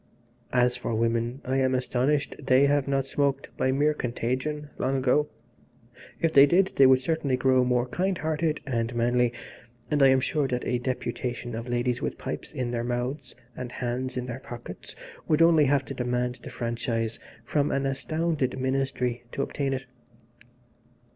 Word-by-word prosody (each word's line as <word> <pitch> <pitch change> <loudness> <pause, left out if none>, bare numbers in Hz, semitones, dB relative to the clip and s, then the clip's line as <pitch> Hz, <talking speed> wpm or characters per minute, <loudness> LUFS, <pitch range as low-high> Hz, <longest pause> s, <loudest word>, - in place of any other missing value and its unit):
"As 125 -1 +3
for 120 -2 -3
women 115 +3 0
I 130 +1 0
am 130 -1 +2
astonished 130 +3 0
they 130 +1 +5
have 140 -1 +2
not 135 -1 +1
smoked, 140 0 -1
by 130 - +1
mere 145 +3 +2
contagion, 130 +4 -3
long 135 +1 +1
ago. 135 +3 +2 0.9
If 165 -1 +1
they 140 +1 +8
did 185 +5 +3
they 135 - +7
would 130 0 +5
certainly 140 -2 0
grow 130 0 +3
more 125 -1 +2
kind 185 +6 -1
hearted 155 0 -1
and 120 -3 -2
manly, 120 +1 +2 0.6
and 145 -1 +2
I 135 - +8
am 130 0 +5
sure 145 +2 0
that 125 -1 -2
a 125 0 0
deputation 125 -1 -3
of 115 +2 -5
ladies 120 0 0
with - - -3
pipes - - -5
in 125 -2 -3
their 120 -1 -2
mouths 125 +2 -3 0.2
and 125 -1 -6
hands 125 +1 -3
in 125 - -2
their 125 0 -5
pockets 120 -8 -8 0.3
would 155 +1 +4
only 165 -3 +6
have 140 0 +2
to - - -6
demand 125 0 -1
the - - -8
franchise 115 -1 -2 0.3
from 145 +3 +1
an 135 0 0
astounded 140 0 -1
ministry 130 -2 -1
to 140 - -1
obtain 140 -1 -2
it. 135 0 -3
130 Hz, 170 wpm, -27 LUFS, 125-140 Hz, 0.9 s, they